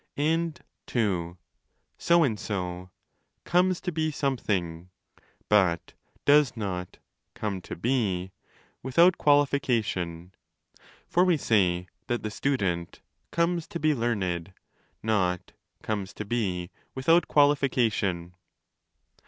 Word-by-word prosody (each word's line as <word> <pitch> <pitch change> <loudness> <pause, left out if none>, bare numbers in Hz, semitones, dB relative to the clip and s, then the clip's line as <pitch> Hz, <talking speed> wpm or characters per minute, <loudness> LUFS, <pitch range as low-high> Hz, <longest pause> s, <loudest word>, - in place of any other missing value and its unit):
And 160 +2 0 0.4
(ii) 90 -7 0 0.6
so 170 0 +4
and 110 -8 0
so 90 -2 -4 0.3
' - - -49
comes 180 0 +4
to 180 - -2
be 155 -1 0
something', 95 - -2 0.6
but 95 -5 +2 0.3
does 145 -3 +5
not.'come 95 0 -6
to - - -7
be' 95 -4 0 0.5
without 170 +8 +4
quali 145 0 +5
fication; 100 -11 -2 0.8
for 175 - +3
we 180 -3 +3
say 90 -8 +2 0.2
that 120 0 -1
the 110 - -3
student 95 -10 -1
' - - -50
comes 170 0 0
to 170 - -5
be 155 -1 +3
learned', 95 - -2 0.5
not 95 -5 0 0.3
'comes 100 -3 -3
to 105 - -5
be' 95 -6 -2 0.2
without 165 +6 +3
qualification. 120 - +2
110 Hz, 110 wpm, -27 LUFS, 90-145 Hz, 0.8 s, does